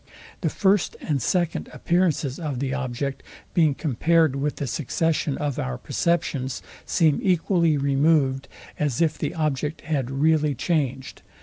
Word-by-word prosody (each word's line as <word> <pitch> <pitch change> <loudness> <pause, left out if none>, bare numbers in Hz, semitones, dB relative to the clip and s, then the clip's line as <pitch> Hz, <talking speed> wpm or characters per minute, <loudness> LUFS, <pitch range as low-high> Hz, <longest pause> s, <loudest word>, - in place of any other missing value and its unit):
The - - +1
first 195 -2 +2
and 145 -4 -1
second 175 +5 0
appearances 170 -6 0
of 150 -6 -3
the 135 +1 -2
object, 135 0 -3 0.3
being 155 -5 +3
compared 160 +1 +2
with 145 +2 -1
the 145 - -3
succession 150 +3 -1
of 145 -3 -2
our 65 -1 -3
perceptions, 140 -6 -1 0.2
seem 160 -4 +3
equally 170 -3 +2
removed 140 -1 +2 0.3
as 145 -5 0
if 160 -2 +1
the - - -2
object 150 -1 -1
had 140 -6 -2
really 150 +1 +2
changed. 135 -3 -2
150 Hz, 135 wpm, -24 LUFS, 135-165 Hz, 0.3 s, being